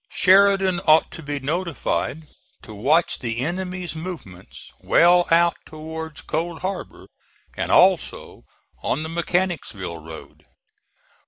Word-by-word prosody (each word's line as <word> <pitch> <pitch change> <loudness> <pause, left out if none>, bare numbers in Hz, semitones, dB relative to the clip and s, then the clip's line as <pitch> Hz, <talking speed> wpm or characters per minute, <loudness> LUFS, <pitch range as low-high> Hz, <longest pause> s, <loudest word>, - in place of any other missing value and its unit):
Sheridan 195 -1 +4
ought 155 +1 +5
to - - -9
be 145 -1 -4
notified 160 0 -2 0.4
to 110 - -11
watch 150 +11 +1
the 115 -2 -3
enemy's 180 +2 -4
movements 160 - -9
well 175 +1 +4
out 170 +1 +3
towards 160 0 -8
Cold 165 +1 -4
Harbor, 190 0 -5 0.5
and - - -3
also - - +2 0.4
on 150 - -1
the 160 - -5
Mechanicsville 165 - -2
road. 75 -1 -12
160 Hz, 110 wpm, -22 LUFS, 140-180 Hz, 0.5 s, ought